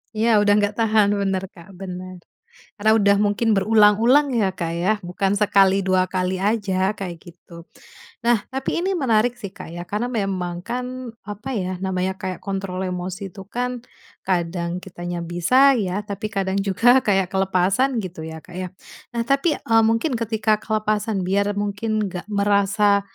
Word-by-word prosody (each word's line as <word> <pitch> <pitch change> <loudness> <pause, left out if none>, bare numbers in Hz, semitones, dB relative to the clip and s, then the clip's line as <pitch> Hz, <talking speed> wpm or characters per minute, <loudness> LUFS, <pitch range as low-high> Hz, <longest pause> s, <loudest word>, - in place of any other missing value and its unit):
Iya, 225 +2 +1
udah 205 0 +4
nggak 205 0 +1
tahan 215 -2 +3
bener, 195 -1 -1
Kak, 170 0 -15
bener. 185 -1 -8 0.5
Karena 215 +1 +3
udah 200 -2 +4
mungkin 210 +1 +2
berulang-ulang, 220 +7 +4
ya, 195 -4 +1
Kak, 170 -3 -4
ya, 185 +5 +2
bukan 185 +2 -1
sekali, 200 -1 +3
dua 185 -1 +2
kali 185 0 0
aja, 195 -1 0
kayak 185 -5 -6
gitu. 170 -1 -13 0.6
Nah, 235 -3 +2
tapi 265 +1 -2
ini 385 +1 0
menarik 245 -6 +2
sih, 225 -6 -8
Kak, 185 - -11
ya. 175 - -6
Karena 210 +7 -3
memang 190 -7 -2
kan, 250 +2 -5 0.2
apa 205 +5 -7
ya, 185 -1 -3
namanya 190 0 -1
kayak 185 -1 -3
kontrol 195 -2 -3
emosi 185 +1 -5
tuh 195 -1 -11
kan 250 0 -3 0.4
kadang 175 -1 -1
kitanya 175 -2 -6
bisa 250 +12 +4
ya, 205 -3 -2
tapi 205 +1 -5
kadang 195 -1 -1
juga 240 +7 +4
kayak 195 -3 +1
kelepasan, 195 +7 +1
gitu 180 -6 -5
ya, 160 0 -7
Kak, 175 +3 -14
ya. 185 0 -4 0.5
Nah, - - +2
tapi, 275 +5 +1
eee, 225 0 +3
mungkin 230 +5 0
ketika 220 -2 0
kelepasan, 215 -2 -1
biar 200 +2 0
mungkin 205 +1 -1
nggak 180 +2 -7
merasa, 200 0 +2
200 Hz, 160 wpm, -22 LUFS, 185-220 Hz, 0.6 s, udah